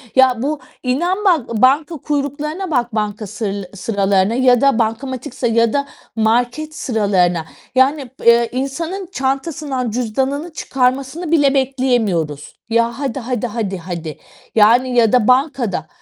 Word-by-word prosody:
Ya, 255 Hz, -3 st, +4 dB
bu 295 Hz, +2 st, -1 dB, 0.2 s
İnan 345 Hz, +11 st, 0 dB
bak 250 Hz, -, +1 dB
banka 290 Hz, +5 st, +3 dB
kuyruklarına 300 Hz, +5 st, -3 dB
bak 240 Hz, -4 st, 0 dB
banka 210 Hz, 0 st, -2 dB
sır 200 Hz, -2 st, -4 dB
sıralarına 195 Hz, 0 st, +1 dB
ya 250 Hz, -2 st, +4 dB
da 275 Hz, -4 st, +3 dB
bankamatik 240 Hz, +3 st, -2 dB
sır 245 Hz, -, -1 dB
ya 230 Hz, 0 st, +2 dB
da 280 Hz, 0 st, 0 dB, 0.3 s
market 245 Hz, +8 st, 0 dB
sıralarına. 185 Hz, -, +1 dB, 0.3 s
Yani, 265 Hz, 0 st, +2 dB
b -, -, -10 dB
eee, 235 Hz, 0 st, +5 dB
insanın 325 Hz, +9 st, -3 dB
çantasından 270 Hz, -, -2 dB
cüzdanını 265 Hz, +7 st, -2 dB
çıkarmasını 270 Hz, +6 st, -1 dB
bile 285 Hz, -4 st, +4 dB
bekleyemiyoruz. 240 Hz, -, 0 dB
Ya, 230 Hz, +3 st, +1 dB
"Hadi, 275 Hz, -2 st, -2 dB
hadi, 245 Hz, -1 st, -2 dB
hadi, 210 Hz, -4 st, -3 dB
hadi." 165 Hz, -3 st, -6 dB, 0.4 s
Yani, 245 Hz, +4 st, +4 dB
ya 225 Hz, -3 st, +5 dB
da 245 Hz, -3 st, +4 dB
bankada. 255 Hz, -, +1 dB
250 Hz, 135 wpm, -18 LUFS, 220-275 Hz, 0.4 s, eee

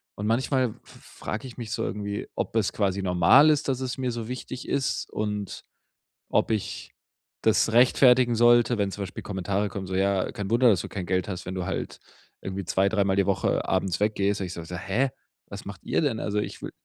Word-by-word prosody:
Und 105 Hz, -, -3 dB
manchmal 130 Hz, +2 st, +1 dB, 0.2 s
f -, -, -17 dB, 0.3 s
frage 110 Hz, +5 st, -4 dB
ich 125 Hz, -, -12 dB
mich 115 Hz, -4 st, -6 dB
so -, -, -1 dB
irgendwie, 100 Hz, 0 st, -4 dB
ob -, -, -3 dB
es 105 Hz, -4 st, +1 dB
quasi 100 Hz, -2 st, 0 dB
normal 95 Hz, -, +6 dB
ist, 150 Hz, -1 st, +2 dB
dass 130 Hz, -1 st, 0 dB
es 130 Hz, -1 st, -3 dB
mir 130 Hz, -2 st, -1 dB
so 115 Hz, -2 st, -5 dB
wichtig 125 Hz, 0 st, -6 dB
ist 140 Hz, -2 st, -1 dB
und 105 Hz, -2 st, -3 dB, 0.7 s
ob -, -, +2 dB
ich 110 Hz, -3 st, -3 dB, 0.5 s
das 110 Hz, +1 st, +3 dB
rechtfertigen 125 Hz, 0 st, +5 dB
sollte, 120 Hz, +1 st, +5 dB
wenn 100 Hz, -1 st, 0 dB
zum 100 Hz, -, -4 dB
Beispiel 95 Hz, -, -7 dB
Kommentare 100 Hz, +1 st, -2 dB
kommen 95 Hz, -1 st, -6 dB
so: 95 Hz, -, -3 dB
„Ja, 95 Hz, 0 st, +1 dB
kein 100 Hz, -1 st, -4 dB
Wunder, 120 Hz, +2 st, +5 dB
dass 95 Hz, -5 st, +3 dB
du -, -, -7 dB
kein 95 Hz, -3 st, -5 dB
Geld 90 Hz, -1 st, 0 dB
hast, 90 Hz, -, -5 dB
wenn 95 Hz, +1 st, -5 dB
du 90 Hz, -, -3 dB
halt -, -, -4 dB, 0.4 s
irgendwie 95 Hz, 0 st, -5 dB
2, 95 Hz, +2 st, +2 dB
dreimal 100 Hz, -2 st, +1 dB
die 100 Hz, -, +3 dB
Woche 100 Hz, -, +1 dB
abends 95 Hz, -1 st, 0 dB
weggehst“, 100 Hz, -1 st, +1 dB
und 95 Hz, -, -2 dB
ich 90 Hz, -, -7 dB
so 85 Hz, -, -7 dB
so: 90 Hz, -, -7 dB
„Hä? 100 Hz, +9 st, 0 dB, 0.4 s
Was 100 Hz, 0 st, -8 dB
macht 100 Hz, -3 st, -9 dB
ihr -, -, +1 dB
denn?“ 135 Hz, -8 st, 0 dB
Also, 105 Hz, 0 st, -1 dB
ich 105 Hz, -, -5 dB
will -, -, -6 dB
105 Hz, 215 wpm, -26 LUFS, 95-120 Hz, 0.7 s, normal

